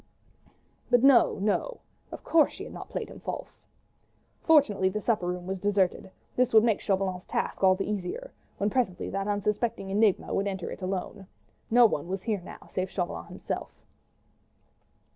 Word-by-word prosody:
But 245 0 +4
no, 270 -3 +6
no! 215 - -1 0.3
of - - -8
course 320 -2 +4
she - - -8
had - - -9
not - - -9
played - - -4
him - - -11
false! - - -7 0.7
Fortunately 235 - +4
the 210 - -3
supper 210 -4 0
room 180 0 -3
was 190 0 -3
deserted: 195 -1 +1 0.3
this 250 -2 +2
would 220 - +8
make 225 -3 +2
Chauvelin's 190 -2 -1
task - - -2
all 185 0 +6
the 195 - -3
easier, 210 - -4 0.3
when 205 +1 0
presently 235 -8 -1
that 195 +1 -2
unsuspecting 205 0 -1
enigma 205 -1 +2
would 200 - 0
enter 190 -3 -4
it - - -8
alone. 190 +1 -4 0.4
No 240 +1 +7
one 160 -8 0
was 190 +1 -4
here 210 -4 -1
now 175 - -11
save 185 0 -3
Chauvelin 175 - -4
himself. - - -5
200 Hz, 165 wpm, -28 LUFS, 185-225 Hz, 0.7 s, would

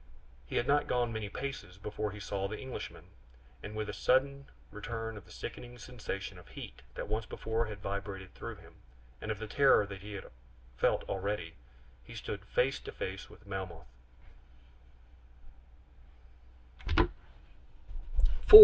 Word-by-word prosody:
He - - -4
had - - +4
not 145 +2 +5
gone 120 -2 +2
many 110 -2 -2
paces 130 -7 -4
before 105 +1 -1
he 105 +1 -6
saw 100 -1 0
the 105 +2 -4
Englishman, 130 -1 -5 0.6
and 105 +1 -5
with 110 -1 0
a - - -2
sudden 140 +2 +4 0.2
return 115 +1 -3
of 100 -4 -8
the 85 - -15
sickening 120 +6 -6
sensation 100 -6 -4
of 85 - -14
heat - - -7
that - - -2
once 110 +2 0
before 110 +1 0
had 105 -3 -6
vibrated 100 -1 -3
through - - -5
him, - - -14 0.5
and - - -3
of 110 - +1
the 110 - -3
terror 135 -1 +7
that 100 -1 -6
he 105 +1 -6
had 100 - -6 0.4
felt - - +4
already, 95 -4 -1 0.5
he - - -10
stood 100 -1 -3
face 130 +6 +3
to - - -6
face 95 +1 -3
with 105 - -14
Melmoth. 95 -5 -4
105 Hz, 145 wpm, -34 LUFS, 100-115 Hz, 0.6 s, terror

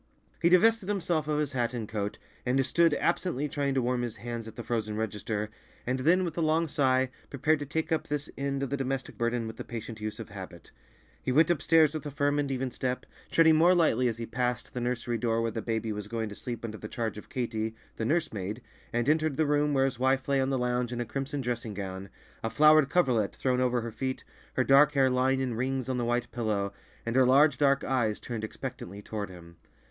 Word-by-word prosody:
He 170 - +5
divested 205 +3 +4
himself 170 -6 0
of 150 -1 0
his 150 -2 0
hat 125 -2 -1
and 115 -3 -4
coat, 105 -1 -3 0.3
and 130 +1 +2
stood 165 +2 +3
absently 170 -4 0
trying 140 -1 -1
to 130 - +2
warm 125 0 0
his 120 -2 -3
hands 115 +1 -6
at 110 - -10
the 120 - -6
frozen 110 -3 -2
register, 105 0 -3 0.3
and 130 +2 -1
then 175 +7 +3
with 165 -3 -4
a 170 - -1
long 160 +1 +2
sigh, 130 -3 +2 0.2
prepared 145 +3 +1
to 145 - -5
take 160 +3 -2
up 160 - 0
this 145 -1 -2
end 140 0 -2
of 135 - -3
the 140 - 0
domestic 135 -1 -3
burden 120 0 -1
with 110 - -7
the - - -5
patient 115 -1 -7
use 105 0 -4
of - - -7
habit. - - -10 0.5
He - - -1
went 160 +6 +5
upstairs 160 -1 +4
with 155 - -4
a - - -3
firm 145 +1 +1
and 145 -1 0
even 130 -1 -2
step, 125 +1 -3 0.2
treading 160 -1 +5
more 175 +3 +6
lightly 130 -8 +3
as 115 -2 -1
he 115 - -4
passed 125 0 -2
the 125 - -3
nursery 120 -1 -1
door 115 0 +1
where 115 0 0
the 115 - -3
baby 110 -1 -2
was 105 -1 -5
going 110 0 -3
to 105 - -8
sleep 120 0 -5
under 110 -1 -6
the 105 - -6
charge 110 -1 -3
of - - -15
Katy, 110 -3 -2 0.2
the - - -2
nurse 155 +6 0
maid, 105 +4 -4 0.3
and 120 +1 0
entered 155 -2 +2
the 160 - +3
room 145 0 +2
where 135 -1 +3
his 130 -3 -2
wife 130 +1 +2
lay 140 -1 +2
on 130 - 0
the 135 - +1
lounge 125 -1 0
in 120 - -3
a 120 - -1
crimson 140 +4 -3
dressing 120 -4 -3
gown, 95 -1 -5 0.3
a 115 - 0
flowered 150 +4 +6
coverlet 125 - +2
thrown 125 -1 +1
over 125 -1 +2
her 115 0 -5
feet, 130 +4 -3 0.3
her 130 - +2
dark 140 +4 +6
hair 135 -2 +4
lying 130 +1 +2
in 130 -2 -1
rings 130 +2 -1
on 130 -1 -1
the 120 - 0
white 120 0 -1
pillow, 105 -4 -1 0.3
and 115 +1 -2
her 130 - +6
large, 145 +4 +5
dark 140 -1 +3
eyes 120 -5 0
turned 115 -3 -5
expectantly 110 -4 -6
toward 105 -2 -4
him. 85 -2 -13
125 Hz, 235 wpm, -29 LUFS, 115-145 Hz, 0.5 s, more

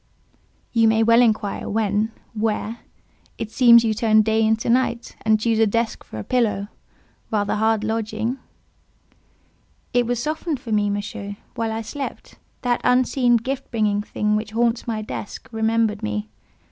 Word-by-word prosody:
"You 225 -1 +4
may 220 0 +3
well 230 +2 +5
inquire 215 -4 0
when—where. 220 +1 -2 0.6
It 220 -1 -5
seems 235 -2 +7
you 225 -1 +1
turn 215 0 +3
day 220 +1 +1
into 220 +1 +1
night, 240 0 0
and 220 -1 +3
choose 225 0 +1
a 225 - +5
desk 230 +2 -1
for - - -10
a 105 - -4
pillow; 210 - 0 0.6
rather 205 -2 0
hard 220 0 +1
lodging—?" 220 +3 -2 1.5
"It 245 -1 +2
was 245 0 0
softened 310 +1 -2
for 235 -3 -8
me, 210 -1 +2
Monsieur, 205 0 -4 0.2
while 225 -1 -2
I 225 +1 -3
slept. 280 +4 -7 0.2
That 245 -1 +1
unseen, 250 -1 +3
gift 260 +4 -4
bringing 210 -3 +1
thing 210 0 -1
which 215 0 -3
haunts 235 +1 +1
my 220 -2 -2
desk, 210 - -7
remembered 220 -1 +1
me. 105 0 -3
220 Hz, 150 wpm, -22 LUFS, 215-235 Hz, 1.5 s, seems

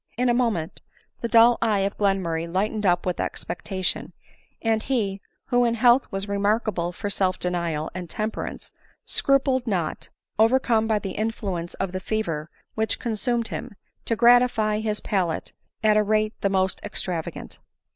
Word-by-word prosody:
In 250 0 +2
a - - +4
moment 225 -10 -1 0.4
the 235 - -1
dull 230 +1 +6
eye 215 -4 +2
of 195 +1 -1
Glenmurray 180 -5 0
lighted 210 +3 0
up 175 0 +2
with 180 -1 -1
expectation; 185 +1 -3 0.5
and 225 -1 +1
he, 210 -7 -1 0.3
who 245 -1 +4
in 235 -1 +2
health 240 +2 +4
was 195 +1 -3
remarkable 200 -3 0
for 205 +4 -5
self 190 -2 +1
denial 170 -3 -2
and 180 -2 -6
temperance, 215 +1 -4 0.3
scrupled 265 -2 +1
not, 175 -7 -2 0.3
overcome 225 -1 +3
by 220 -1 +2
the 195 -2 -4
influence 195 -5 -3
of 195 -2 -2
the 185 - -3
fever 170 -7 -2 0.2
which 220 0 0
consumed 235 0 -1
him, 245 -4 -6 0.3
to 230 - 0
gratify 235 -2 +4
his 215 -1 -2
palate 180 -5 -1 0.3
at 215 -1 +5
a - - +5
rate 215 +1 +1
the 200 - +2
most 190 -1 0
extravagant. 180 -5 -4
210 Hz, 155 wpm, -24 LUFS, 185-230 Hz, 0.5 s, dull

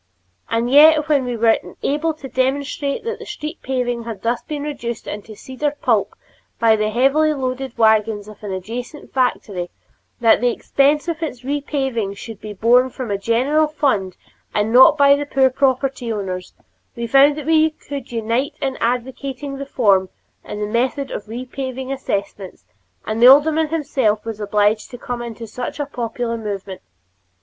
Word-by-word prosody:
And 230 +2 0
yet 305 +2 +7
when 280 -4 +3
we 245 -1 -3
were 225 0 +4 0.2
able 305 +3 0
to 275 -3 -9
demonstrate 275 +2 -1
that 460 0 -4
the - - -9
street 315 -5 -6
paving 245 -2 -2
had 220 -4 -7
thus 235 +1 0
been 295 -2 -5
reduced 240 -6 -5
into 210 +1 -7
cedar 265 +7 -3
pulp - - +1 0.4
by 225 -1 +4
the 215 0 0
heavily 275 +7 +2
loaded 260 -1 -4
wagons 220 -2 +2
of 215 -1 -13
an 205 - -5
adjacent 235 +10 -7
factory, 205 -8 -1 0.5
that 230 -2 +4
the 245 - +3
expense 285 +6 +1
of 335 -1 -3
its 255 -7 -4
repaving 265 -7 -2
should 225 -1 -9
be 215 - -7
borne 240 +5 +3
from 250 -3 -6
a 200 - 0
general 260 +9 +2
fund 235 - -1 0.4
and 210 +2 +1
not 265 +5 +8
by 280 -1 +6
the 290 0 -4
poor 265 -2 +3
property 260 -2 0
owners, 185 -4 -5 0.4
we 235 -1 -3
found 275 +4 +5
that 300 - -6
we 315 0 +4
could 285 -4 -8
all 235 - -4
unite 230 +5 -1
in 270 -1 -2
advocating 260 +3 -3
reform 220 -9 +1 0.3
in 210 - -7
the 210 - -1
method 250 +5 -1
of - - -5
repaving 260 +3 -5
assessments, 200 - -4 0.4
and 220 +1 -2
the 245 - +9
alderman 305 +4 +6
himself 270 -9 0
was 225 -2 -5
obliged 210 +1 +1
to 245 - -9
come 245 0 -5
into 235 -1 -7
such 250 +6 -6
a 290 - -1
popular 240 -3 -3
movement. 200 -3 -6
250 Hz, 170 wpm, -20 LUFS, 220-280 Hz, 0.5 s, the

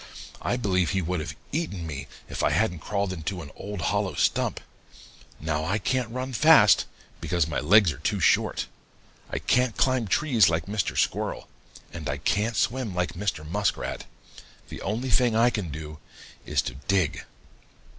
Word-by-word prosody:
I 120 - 0
believe 95 -7 +1
he 95 -1 0
would 90 +1 -1
have 75 - -5 0.2
eaten 140 - -3
me, 70 -4 -6 0.2
if - - -4
I - - +3
hadn't 90 +2 +1
crawled 100 +2 -2
into 90 +1 -4
an 70 - -11
old 100 -2 -6
hollow 100 -5 0
stump. - - +1 0.8
Now 80 0 -1
I 95 +6 0
can't 125 +1 -1
run 130 +2 -4
fast, 145 - +6 0.3
because 85 -3 0
my 80 - -2
legs 90 +5 +5
are 70 - -9
too 95 +7 -1
short. 85 - +2 0.6
I - - -3
can't 125 -3 +1
climb 130 -4 +2
trees 115 - +4
like 80 0 -1
Mr. 100 -1 -2
Squirrel, - - -1 0.5
and 80 -4 -5
I 70 - -1
can't 105 +9 0
swim 115 -3 0
like 90 -1 -1
Mr. 90 -5 -3
Muskrat. 100 +5 -2 0.6
The - - -8
only 120 +4 -2
thing 120 -1 +3
I 120 +2 +4
can 100 -8 -3
do 75 0 -7 0.5
is - - +1
to 60 - -4
dig.' 90 +5 0
100 Hz, 165 wpm, -26 LUFS, 80-110 Hz, 0.8 s, fast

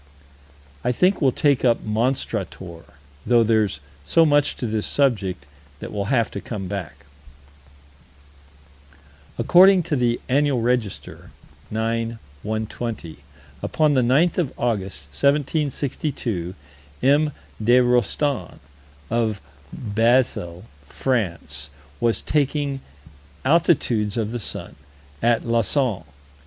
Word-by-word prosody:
I 125 - +2
think 180 +10 +2
we'll 135 -3 +4
take 140 0 +2
up 120 -2 +2
Monstrator, 105 -7 -2 0.4
though 120 -1 +4
there's 110 -6 +1 0.2
so 165 - +4
much 145 -1 +3
to - - -4
this 110 -2 -1
subject 105 - 0 0.3
that - - -7
we'll 100 -1 -2
have 115 -1 +1
to 100 - -5
come 100 -5 -5
back. 85 -8 -6 2.3
According 180 +9 +6
to 150 - -1
the 120 -2 +1
Annual 140 0 +2
Register, 115 -4 -2 0.4
9 115 +1 -2 0.2
120, 110 - -4 0.4
upon 155 -2 +2
the 130 - +3
9th 145 +9 +3
of 160 -7 0
August, 95 - -2
1762, 140 - -1 0.5
M. 145 +3 +4 0.3
de 120 +3 +5
Rostan, 125 +3 +1 0.5
of 110 -3 0 0.3
Basle, 110 -5 0 0.2
France, 85 - -2 0.3
was 115 -1 +1
taking 145 -2 0 0.6
altitudes 130 - +2
of 110 -1 -1
the 120 - -3
sun, - - -5 0.5
at 115 -1 +2
Lausanne. 115 - +1
120 Hz, 105 wpm, -22 LUFS, 105-140 Hz, 2.3 s, According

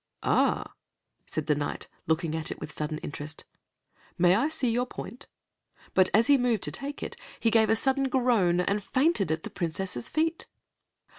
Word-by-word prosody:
"Ah!" - - +2 0.5
said 155 - -3
the 155 - +3
Knight, 145 0 -3 0.2
looking 160 0 0
at 160 -1 -2
it - - -6
with 150 - -7
sudden 155 0 -3
interest, 150 +1 -7 0.7
"may 175 0 +5
I 235 +10 +2
see 280 -5 -1
your 245 +2 0
point?" 250 +1 -8 0.7
But 185 0 +4
as 225 +2 +4
he 280 +1 +5
moved 240 -5 +1
to - - -2
take 285 +1 -5
it, - - -5 0.2
he 225 - +2
gave 220 -1 +4
a 225 - +5
sudden 270 +3 +1
groan 230 -9 +3
and 200 +3 0
fainted 260 - +2
at 160 0 -1
the - - -7
Princess's 170 -7 -3
feet. 320 +1 -1
205 Hz, 175 wpm, -28 LUFS, 160-255 Hz, 0.7 s, may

